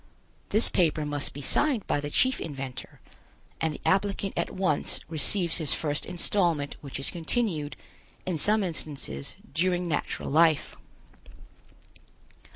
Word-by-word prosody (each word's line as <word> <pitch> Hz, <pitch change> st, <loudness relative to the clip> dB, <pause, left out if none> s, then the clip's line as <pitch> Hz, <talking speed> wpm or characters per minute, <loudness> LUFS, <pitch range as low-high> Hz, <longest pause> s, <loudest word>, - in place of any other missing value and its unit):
This 215 Hz, +3 st, +6 dB
paper 160 Hz, -3 st, +2 dB
must 145 Hz, -1 st, -2 dB
be 145 Hz, -, -8 dB
signed 265 Hz, -, +2 dB
by -, -, +1 dB
the 145 Hz, 0 st, -4 dB
Chief 260 Hz, -, +2 dB
Inventor, 135 Hz, -4 st, -6 dB, 0.6 s
and 160 Hz, -, +2 dB
the -, -, -8 dB
applicant 195 Hz, 0 st, +1 dB
at -, -, 0 dB
once 185 Hz, -6 st, 0 dB
receives 170 Hz, +3 st, +1 dB
his 155 Hz, -4 st, +1 dB
first 145 Hz, -2 st, -1 dB
installment 170 Hz, -5 st, 0 dB
which 140 Hz, -2 st, -6 dB
is 135 Hz, -, -1 dB
continued, 165 Hz, -3 st, -1 dB, 0.5 s
in 175 Hz, -4 st, -1 dB
some 210 Hz, +5 st, +3 dB
instances, 150 Hz, -, -4 dB, 0.2 s
during 180 Hz, +2 st, +1 dB
natural 150 Hz, -3 st, -2 dB
life. 160 Hz, 0 st, +4 dB
160 Hz, 130 wpm, -28 LUFS, 145-190 Hz, 0.6 s, This